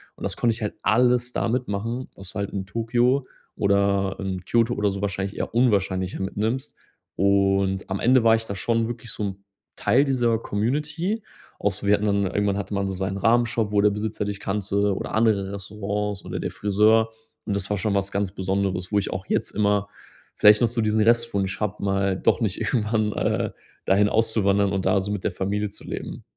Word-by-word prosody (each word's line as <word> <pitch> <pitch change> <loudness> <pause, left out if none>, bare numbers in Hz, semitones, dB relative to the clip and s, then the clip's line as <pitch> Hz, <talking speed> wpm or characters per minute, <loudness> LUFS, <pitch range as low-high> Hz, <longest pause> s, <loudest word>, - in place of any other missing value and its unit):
Und - - -12
das - - -2
konnte 115 -1 +2
ich 115 - -9
halt 105 - -2
alles 125 +2 +3
da - - -1
mitmachen, 115 +1 -2
was 95 -1 -10
du - - -25
halt 100 0 -3
in 95 -1 -4
Tokio 120 +5 +1 0.3
oder 100 -1 +1
in 95 -2 -4
Kyoto 115 0 +2
oder 105 -1 +1
so 100 0 -5
wahrscheinlich 100 0 -3
eher - - -3
unwahrscheinlicher 95 -6 +1
mitnimmst. 110 +8 -2 0.4
Und 95 -1 +2
am 95 +1 -2
Ende 125 0 +4
war 115 0 +7
ich 115 0 -3
da 100 - -5
schon 115 +3 0
wirklich 120 -1 -7
so 105 - -5
'n 95 -1 -2 0.4
Teil 135 +3 +3
dieser 120 -5 +1
Community 150 - -2 0.4
auch - - +1
so 100 - -6
wir 105 - +6
hatten 105 - -2
dann 100 -1 +2
irgendwann 100 +1 0
hatte 100 0 -4
man 100 0 0
so 95 - -3
seinen 95 +1 -2
Ramen-Shop, 115 0 +2
wo 100 - +3
der 105 - +5
Besitzer 105 0 -3
dich 100 -1 -4
kannte 100 0 0
oder - - -4
andere 105 -3 +2
Restaurants 100 0 -4
oder - - -4
der - - -3
Friseur. 110 +2 +3 0.4
Und 100 - -1
das 100 -1 -2
war 105 - 0
schon 100 0 0
was 100 0 0
ganz 100 -1 -1
Besonderes, 95 0 -2
wo 105 - +3
ich 100 - -3
auch 95 0 -4
jetzt - - 0
immer 100 -1 +1 0.5
vielleicht 105 +1 +6
noch 120 - +5
so 120 0 -1
diesen 110 0 +2
Restwunsch 110 -4 +1
habe, 105 -1 -3
mal 95 -1 +1
doch 95 - +1
nicht 100 -5 -1
irgendwann, 110 -2 0
äh, - - 0 0.4
dahin 100 +2 +4
auszuwandern 100 -3 +2
und 95 -1 -1
da 100 - +3
so 100 - -5
mit 105 -3 -3
der - - 0
Familie 100 +3 -2
zu - - -11
leben. - - -6
105 Hz, 205 wpm, -24 LUFS, 100-115 Hz, 0.5 s, war